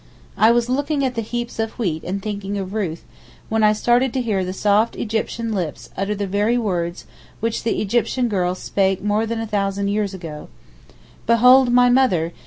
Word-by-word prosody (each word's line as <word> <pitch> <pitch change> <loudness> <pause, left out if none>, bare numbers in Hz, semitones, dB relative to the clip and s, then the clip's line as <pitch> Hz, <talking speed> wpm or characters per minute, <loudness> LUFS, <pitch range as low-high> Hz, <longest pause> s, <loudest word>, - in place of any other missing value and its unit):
I 220 - +5
was 235 0 +3
looking 280 +2 0
at 255 - -1
the 230 - -2
heaps 240 +1 -5
of 225 0 -3
wheat 170 -9 -2
and 190 +2 -4
thinking 205 -1 -4
of 190 0 -5
Ruth, 180 -7 -3 0.5
when 225 0 +1
I 210 0 +5
started 240 +4 +2
to 260 - 0
hear 205 -5 0
the 185 - -3
soft 205 +3 +2
Egyptian 225 +1 -2
lips 175 -7 -4
utter 195 +2 -2
the 200 0 -2
very 205 +5 +1
words 175 -6 -2 0.3
which 225 0 -2
the 225 - -1
Egyptian 240 +4 0
girl 185 -4 0
spake 190 0 0
more 210 +2 +1
than 230 0 -3
a 225 - -3
thousand 200 -1 -1
years 205 -1 -1
ago: 160 -5 -8 0.8
'Behold 250 +2 +6
my 245 0 +5
mother! 185 -11 +2
210 Hz, 190 wpm, -21 LUFS, 195-235 Hz, 0.8 s, Behold